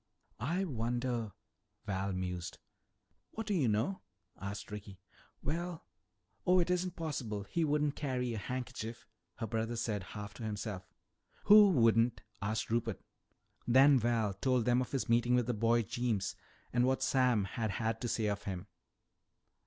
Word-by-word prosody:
"I 170 - 0
wonder 120 - -2 0.3
" - - -47
Val 95 0 -1
mused. 90 -2 -4 0.8
"What 225 - -4
do 210 - -1
you 155 -10 +2
know?" 110 - 0 0.3
asked 100 +1 -6
Ricky. 100 -2 -8 0.4
"Well 170 +2 -3 0.6
Oh, 185 -1 +4
it 180 0 +2
isn't 180 0 0
possible. 130 -11 -3
He 160 +12 -1
wouldn't 150 -1 +1
carry 125 -4 -1
a 110 - -3
handkerchief," 120 0 -5 0.3
her - - -4
brother 115 +2 -2
said 110 -3 -1 0.2
half 105 0 -6
to 120 - -9
himself. 105 -3 -4 0.6
"Who 210 0 +9
wouldn't?" 115 - +4 0.2
asked 110 +2 -2
Rupert. 115 -2 0 0.7
Then 135 +3 +7
Val 115 -3 +1
told 125 +4 +1
them 125 +1 +3
of 125 - -4
his 135 - -1
meeting 120 +1 +3
with 125 -1 +2
the 125 - 0
boy 115 +2 +3
Jeems 110 -2 -1 0.4
and 120 0 +3
what 130 0 +1
Sam 125 -6 +3
had 110 +3 -2
had 115 +2 -2
to 120 - -1
say 110 -1 0
of 100 -1 -2
him. 95 -1 -4
120 Hz, 155 wpm, -33 LUFS, 105-130 Hz, 0.8 s, Who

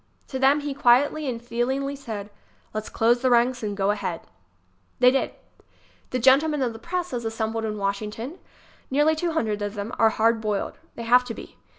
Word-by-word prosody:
To 265 - -4
them 275 +3 +4
he 290 -1 -3
quietly 280 +3 +3
and 235 -2 -3
feelingly 250 +4 -2
said: 220 -7 -7 0.4
"Let's 215 0 -4
close 235 +2 +2
the 260 - +3
ranks 245 +1 +3
and 205 -2 -3
go 195 0 +2
ahead." 190 -5 -3 0.8
They 250 0 +6
did. 270 - 0 0.8
The 255 - -1
gentlemen 275 +4 +4
of 240 -2 -1
the 225 - -10
press 355 +2 -3
as 240 -1 -2
assembled 225 0 -2
in 215 -1 -3
Wash 200 0 -1
ington 220 +5 -6
ŌĆö 350 - -14 0.5
nearly 295 +4 +3
two 335 +1 -1
hundred 215 -9 -1
of 205 +1 -3
them 205 +2 -4
ŌĆö - - -6
are 225 - +6
hard 225 +1 +2
boiled. 210 -2 -2 0.2
They 235 - -6
have 245 +2 +5
to 230 -2 -5
be. - - -11
240 Hz, 205 wpm, -25 LUFS, 220-270 Hz, 0.8 s, They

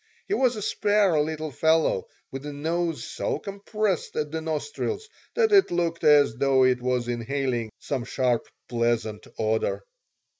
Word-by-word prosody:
He 395 - -1
was 255 - +2
a 210 - -4
spare 205 -6 +2
little 155 0 -3
fellow 160 - +2 0.2
with 135 +1 -6
a - - -4
nose 165 +3 -2
so - - -2
compressed 200 -1 -2
at 150 -1 -2
the 160 0 -3
nostrils 415 - -3 0.3
that 450 -2 +3
it 395 -2 +6
looked 170 -1 -1
as 145 -6 +5
though 135 0 +4
it 125 -1 +2
was 125 -1 0
inhaling 120 -1 -2
some 130 -4 -3
sharp, 125 -1 0 0.2
pleasant 115 -3 -1
odor. 110 0 0
150 Hz, 150 wpm, -26 LUFS, 125-175 Hz, 0.3 s, it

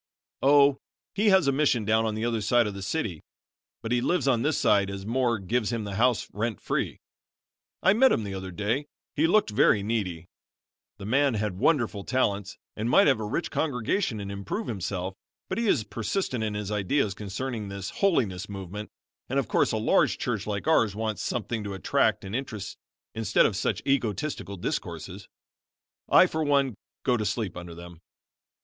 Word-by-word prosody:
"Oh, 140 0 +5 0.3
he 210 +1 +3
has 190 -6 +5
a - - +5
mission 135 -6 +2
down 110 +2 +2
on 110 - -2
the 110 +2 -2
other 115 -2 0
side 120 +3 +3
of 105 - -3
the 100 - -7
city, 95 - -2 0.6
but 115 - -4
he 125 -1 +2
lives 175 +1 +1
on 125 -4 +3
this 150 +3 +1
side 100 -1 +3
as 100 0 -6
Moore 120 +1 +1
gives 110 +3 -1
him 115 -2 -2
the 100 -1 -5
house 120 +3 +2
rent 110 +1 -2
free. - - -2 0.9
I 190 - +6
met 260 +5 +5
him 110 - +1
the 100 -1 -5
other 95 0 -5
day. 110 - -2 0.3
He 155 +2 +3
looked 205 - +3
very 105 0 +4
needy. 95 -7 -2 0.7
The 100 - -8
man 135 +3 +2
had 105 -3 -2
wonderful 120 -10 +1
talents 105 -5 -1 0.2
and 110 +2 -2
might 195 - +6
have 135 -6 +3
a - - -3
rich 135 +11 -2
congregation 135 - -1
and 100 -1 -5
improve 100 - -4
himself; 95 -2 -3 0.4
but 190 - -2
he 235 - 0
is 115 - +3
persistent 120 - -2
in 105 -1 -2
his 105 -1 -4
ideas 105 +2 +1
concerning 105 +3 -4
this 100 -1 -5
holiness 105 - 0
movement, 100 +1 -6 0.4
and - - -1
of - - +1
course - - +2
a - - 0
large - - +2
church 110 -5 -2
like 100 -2 -3
ours 115 -10 +3
wants 110 0 -2
something 115 -1 -2
to 100 -1 -5
attract 95 - +1
and 95 +3 -4
interest 110 -6 -5 0.4
instead 110 -1 +3
of 105 - +1
such - - -1
egotistical 110 -5 -1
discourses. 90 +2 -5 0.8
I, - - +7
for 160 0 -2
one, 140 -3 +2 0.3
go 125 -2 +2
to 110 - -2
sleep 105 -2 -2
under 85 -1 -8
them." 85 -1 -11
110 Hz, 185 wpm, -27 LUFS, 100-130 Hz, 0.9 s, I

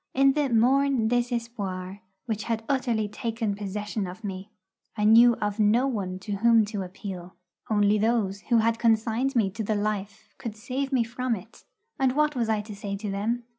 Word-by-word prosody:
In 270 +1 +5
the 290 -1 0
morne 255 +1 +3
désespoir 230 -6 -2 0.3
which 220 -4 -3
had 225 -1 -2
utterly 240 -6 0
taken 225 0 -3
possession 205 0 -4
of 185 +5 -9
me, 195 0 -6 0.5
I 210 - 0
knew 230 +3 +7
of 205 0 -3
no 220 +5 +4
one 200 -8 -2
to 200 0 -4
whom 230 +1 +5
to 205 - -2
appeal. 185 -1 -7 0.3
Only 210 -1 +3
those 210 -3 0
who 235 - +5
had 230 +1 +2
consigned 230 +3 +1
me 210 -5 +2
to 220 +3 -4
the 215 +1 0
life 205 0 -3
could 225 -3 -5
save 260 +4 -3
me 255 -3 +3
from 245 +1 -2
it, 215 +3 -13 0.3
and 265 -2 +2
what 300 +1 +1
was 235 -3 0
I 215 -1 +1
to 210 0 -9
say 200 0 -4
to 205 0 -4
them? 225 +5 -1
220 Hz, 185 wpm, -26 LUFS, 205-240 Hz, 0.5 s, knew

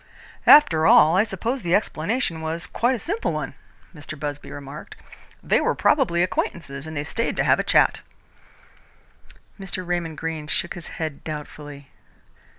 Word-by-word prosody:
"After 160 - +7
all, 160 +2 +6
I 195 - +5
suppose 225 +5 -3
the 175 0 +1
explanation 190 -2 -1
was 160 +2 -1
quite 245 +3 0
a - - -3
simple 390 - -2
one," - - -4 0.4
Mr. 155 -1 -9
Busby 145 -1 -5
remarked. 145 +1 -9 0.5
"They - - +2
were - - +1
probably 200 - +2
acquaintances, 155 -5 -3
and 155 -1 -6
they 145 - -1
stayed 230 +9 -2
to - - +1
have - - +3
a - - +1
chat." - - +3 1.6
Mr. 190 -1 -5
Raymond 170 -3 -3
Greene 160 -1 -4
shook 170 +2 -1
his 175 - -9
head 155 -3 -5
doubtfully. 145 -2 -8
165 Hz, 155 wpm, -23 LUFS, 150-195 Hz, 1.6 s, After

